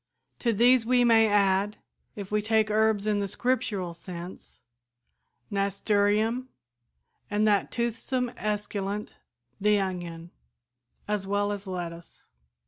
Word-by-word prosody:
To 235 Hz, -, +1 dB
these 240 Hz, +3 st, +5 dB
we 245 Hz, +1 st, +3 dB
may 225 Hz, -2 st, +5 dB
add, 200 Hz, 0 st, +2 dB, 0.4 s
if 200 Hz, -1 st, -7 dB
we 210 Hz, 0 st, +2 dB
take 215 Hz, 0 st, +2 dB
herbs 215 Hz, -1 st, +2 dB
in 210 Hz, -1 st, +1 dB
the 200 Hz, -, -1 dB
Scriptural 220 Hz, -5 st, -1 dB
sense, 175 Hz, +1 st, -10 dB, 0.9 s
nasturtium, 205 Hz, +4 st, +1 dB, 0.8 s
and 210 Hz, +1 st, +1 dB
that 205 Hz, -2 st, +2 dB
toothsome 240 Hz, +1 st, -2 dB
esculent, 210 Hz, -1 st, -3 dB, 0.4 s
the 210 Hz, 0 st, +3 dB
onion, 175 Hz, -3 st, -4 dB, 0.8 s
as 205 Hz, -2 st, -2 dB
well 205 Hz, +1 st, 0 dB
as 200 Hz, -1 st, -5 dB
lettuce. 170 Hz, -2 st, -7 dB
205 Hz, 115 wpm, -27 LUFS, 195-220 Hz, 0.9 s, these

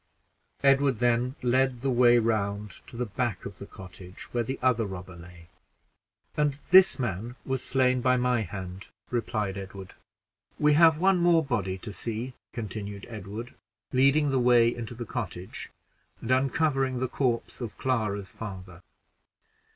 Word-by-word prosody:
Edward 135 Hz, -2 st, +4 dB
then 120 Hz, +2 st, +1 dB
led 130 Hz, 0 st, +2 dB
the 135 Hz, 0 st, 0 dB
way 120 Hz, -1 st, +5 dB
round 105 Hz, -3 st, 0 dB, 0.2 s
to 115 Hz, -, -10 dB
the 125 Hz, -, -1 dB
back 115 Hz, -2 st, -3 dB
of 100 Hz, -, -8 dB
the 100 Hz, -, -8 dB
cottage 90 Hz, 0 st, -11 dB
where 120 Hz, -1 st, 0 dB
the 130 Hz, +4 st, -4 dB
other 120 Hz, -4 st, +2 dB
robber 90 Hz, -1 st, -8 dB
lay 85 Hz, -1 st, -13 dB, 0.9 s
"And 150 Hz, -1 st, +2 dB, 0.2 s
this 190 Hz, +1 st, +8 dB
man 120 Hz, -1 st, -3 dB
was 130 Hz, -1 st, -2 dB
slain 130 Hz, -1 st, +2 dB
by 130 Hz, +1 st, +3 dB
my 125 Hz, -1 st, +1 dB
hand," 95 Hz, -1 st, -7 dB, 0.2 s
replied 105 Hz, -5 st, -2 dB
Edward. 95 Hz, -1 st, -9 dB, 0.6 s
"We 150 Hz, 0 st, +4 dB
have 160 Hz, 0 st, +6 dB
one 190 Hz, +2 st, +3 dB
more 170 Hz, -2 st, +4 dB
body 100 Hz, -8 st, -1 dB
to 105 Hz, +2 st, -8 dB
see," 115 Hz, +4 st, -4 dB, 0.2 s
continued 100 Hz, -2 st, -6 dB
Edward, 110 Hz, +2 st, -7 dB, 0.4 s
leading 140 Hz, +3 st, +4 dB
the 135 Hz, -, +2 dB
way 120 Hz, -1 st, +5 dB
into 120 Hz, 0 st, -7 dB
the 120 Hz, 0 st, -6 dB
cottage, 95 Hz, -8 st, -5 dB, 0.5 s
and 115 Hz, -, -4 dB
uncovering 135 Hz, 0 st, +1 dB
the 130 Hz, +1 st, -1 dB
corpse 125 Hz, -1 st, -2 dB
of 115 Hz, -3 st, -6 dB
Clara's 105 Hz, -7 st, -1 dB
father. 95 Hz, -4 st, -8 dB
120 Hz, 150 wpm, -27 LUFS, 100-130 Hz, 0.9 s, this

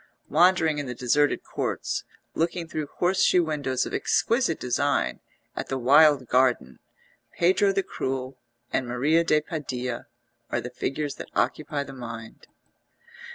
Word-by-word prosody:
Wandering 165 Hz, -2 st, +4 dB
in 145 Hz, -, -4 dB
the 125 Hz, -, -5 dB
deserted 140 Hz, +5 st, +1 dB
courts, -, -, -3 dB, 0.3 s
looking 170 Hz, +1 st, -1 dB
through 155 Hz, -2 st, -4 dB
horseshoe 180 Hz, 0 st, +3 dB
windows 140 Hz, -5 st, -1 dB
of -, -, -7 dB
exquisite 230 Hz, -8 st, +1 dB
design 140 Hz, +3 st, 0 dB, 0.4 s
at -, -, -4 dB
the 135 Hz, -, -2 dB
wild 140 Hz, +1 st, +5 dB
garden, 125 Hz, -, +1 dB, 0.6 s
Pedro 190 Hz, +3 st, +3 dB
the 195 Hz, 0 st, 0 dB
Cruel 130 Hz, -3 st, -4 dB, 0.3 s
and 130 Hz, -, 0 dB
Maria 145 Hz, +7 st, +2 dB
de 155 Hz, -2 st, +3 dB
Padilla 130 Hz, -6 st, -4 dB, 0.4 s
are -, -, 0 dB
the 125 Hz, -, -6 dB
figures 145 Hz, +3 st, -3 dB
that -, -, -8 dB
occupy 150 Hz, -1 st, 0 dB
the 135 Hz, -1 st, -10 dB
mind. 115 Hz, -3 st, -9 dB
145 Hz, 135 wpm, -26 LUFS, 130-160 Hz, 0.6 s, wild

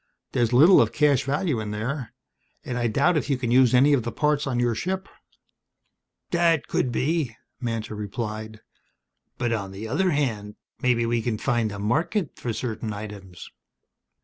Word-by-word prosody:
There's 120 Hz, -1 st, +1 dB
little 155 Hz, +10 st, +7 dB
of -, -, +1 dB
cash 145 Hz, -3 st, +3 dB
value 145 Hz, -1 st, 0 dB
in 110 Hz, -1 st, -4 dB
there. 115 Hz, +5 st, -4 dB, 0.5 s
And 125 Hz, -, -3 dB
I 120 Hz, -1 st, 0 dB
doubt 140 Hz, +9 st, +2 dB
if 145 Hz, -1 st, -2 dB
you 135 Hz, -, +2 dB
can 120 Hz, -2 st, -2 dB
use 125 Hz, 0 st, +5 dB
any 140 Hz, +4 st, +5 dB
of 135 Hz, -, +3 dB
the 120 Hz, +1 st, -4 dB
parts 150 Hz, +1 st, 0 dB
on 125 Hz, -2 st, -1 dB
your 120 Hz, -1 st, +2 dB
ship." 190 Hz, -, -3 dB, 1.2 s
"That 170 Hz, -3 st, +2 dB
could 125 Hz, -, 0 dB
be," 140 Hz, -1 st, 0 dB, 0.2 s
Mantor 115 Hz, -3 st, -3 dB
replied. 110 Hz, +1 st, -5 dB, 0.8 s
"But 120 Hz, -1 st, 0 dB
on 100 Hz, -4 st, -3 dB
the 100 Hz, +3 st, -7 dB
other 165 Hz, +11 st, +1 dB
hand, 115 Hz, -9 st, -1 dB, 0.3 s
maybe 120 Hz, -2 st, +2 dB
we 115 Hz, 0 st, 0 dB
can 110 Hz, -1 st, -2 dB
find 120 Hz, -3 st, 0 dB
a 100 Hz, -, -6 dB
market 155 Hz, -, -1 dB
for 120 Hz, -, -3 dB
certain 110 Hz, -1 st, -4 dB
items." 100 Hz, -4 st, -9 dB
120 Hz, 170 wpm, -25 LUFS, 110-145 Hz, 1.2 s, little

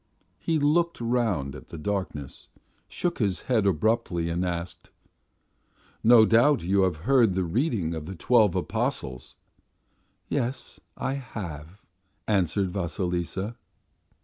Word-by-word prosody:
He 165 Hz, -1 st, 0 dB
looked 165 Hz, +4 st, +2 dB
round 115 Hz, -, 0 dB
at -, -, -12 dB
the 85 Hz, -, -8 dB
darkness, 75 Hz, -6 st, -4 dB, 0.4 s
shook 175 Hz, -1 st, -2 dB
his 100 Hz, -6 st, 0 dB
head 110 Hz, -6 st, +2 dB
abruptly 90 Hz, -2 st, +1 dB
and 85 Hz, +2 st, -1 dB
asked: 90 Hz, -1 st, -4 dB, 1.1 s
"No 115 Hz, -1 st, +8 dB
doubt 120 Hz, -, +4 dB
you 95 Hz, +3 st, +2 dB
have 90 Hz, -3 st, 0 dB
been 135 Hz, 0 st, +5 dB
at 90 Hz, -, -3 dB
the 95 Hz, -, +1 dB
reading 100 Hz, -, 0 dB
of 80 Hz, -1 st, -6 dB
the 95 Hz, -, -6 dB
Twelve 100 Hz, -3 st, +3 dB
Gospels?" 110 Hz, -, -3 dB, 0.9 s
"Yes, 130 Hz, -1 st, -3 dB, 0.2 s
I 135 Hz, -, -2 dB
have," 95 Hz, -, -7 dB, 0.4 s
answered 95 Hz, -2 st, +1 dB
Vasilisa. 90 Hz, +3 st, -3 dB
100 Hz, 120 wpm, -26 LUFS, 85-120 Hz, 1.1 s, No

